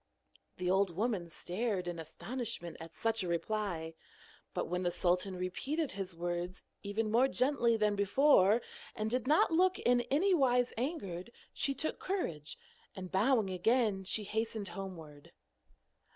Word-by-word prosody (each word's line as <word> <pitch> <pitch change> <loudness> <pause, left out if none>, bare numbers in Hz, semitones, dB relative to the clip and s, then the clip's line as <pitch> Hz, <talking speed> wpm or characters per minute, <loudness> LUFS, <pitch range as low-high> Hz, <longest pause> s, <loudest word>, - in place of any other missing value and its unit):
The 180 - -3
old 190 -1 +2
woman 200 -4 -1
stared 185 +2 -2
in 175 -1 -4
astonishment 175 +2 -5
at 165 0 -10
such 225 -1 0
a 185 - -2
reply. 170 -2 -2 0.6
But - - -2
when 180 +1 -2
the 175 - +1
sultan 180 +2 0
repeated 270 - -2
his 190 -2 -5
words 175 +2 -3 0.2
even 210 +2 -2
more 245 +4 +5
gently 255 -4 +2
than 210 -1 +2
before, 205 +1 +4 0.3
and 215 +1 -2
did 250 0 0
not 310 +3 +4
look 365 +3 +3
in 245 0 +3
anywise 275 -7 +3
angered, 235 - -4 0.2
she 275 - 0
took 315 +4 -1
courage, 165 - -3 0.4
and 185 -1 -7
bowing 215 0 +3
again 210 +1 +2
she 210 +3 0
hastened 220 -1 -2
homeward. 170 -4 -9
205 Hz, 140 wpm, -33 LUFS, 180-245 Hz, 0.6 s, more